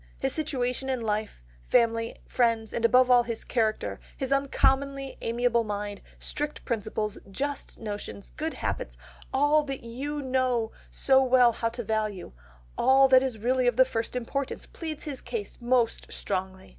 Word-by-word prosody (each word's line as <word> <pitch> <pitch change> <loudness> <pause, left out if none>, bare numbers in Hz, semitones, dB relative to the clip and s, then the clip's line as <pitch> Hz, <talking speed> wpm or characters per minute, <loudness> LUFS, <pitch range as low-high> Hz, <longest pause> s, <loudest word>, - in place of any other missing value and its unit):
His - - -1
situation 265 -3 -1
in 260 -2 -1
life, 215 - -2 0.2
family, 230 - +2
friends 230 -3 +1
and 230 - -2
above 250 +2 +5
all 245 -1 +7
his 235 -1 -4
character, 220 -3 -1 0.2
his 265 -1 -3
uncommonly 275 0 +1
amiable 235 0 +1
mind, 205 -1 -4 0.2
strict 295 0 -4
principles, 215 -2 -2
just 280 +8 -4
notions, 205 - -6
good - - -3
habits, - - -3 0.3
all 290 +3 +4
that 275 -2 -5
you 280 +5 -4
know 255 -3 +1 0.2
so 265 -1 +4
well 250 -2 +5
how 230 +1 -1
to 240 +1 -5
value, 215 -3 -2 0.5
all 270 +1 +6
that 260 -1 +7
is 260 -4 -2
really 250 +3 +1
of 245 - +3
the 260 - +7
first 230 -1 -3
importance, 265 +3 -3
pleads 315 -3 -7
his 280 -4 -5
cause 230 -4 -5
most 240 -1 +1
strongly. 190 -1 -4
245 Hz, 155 wpm, -27 LUFS, 220-265 Hz, 0.5 s, all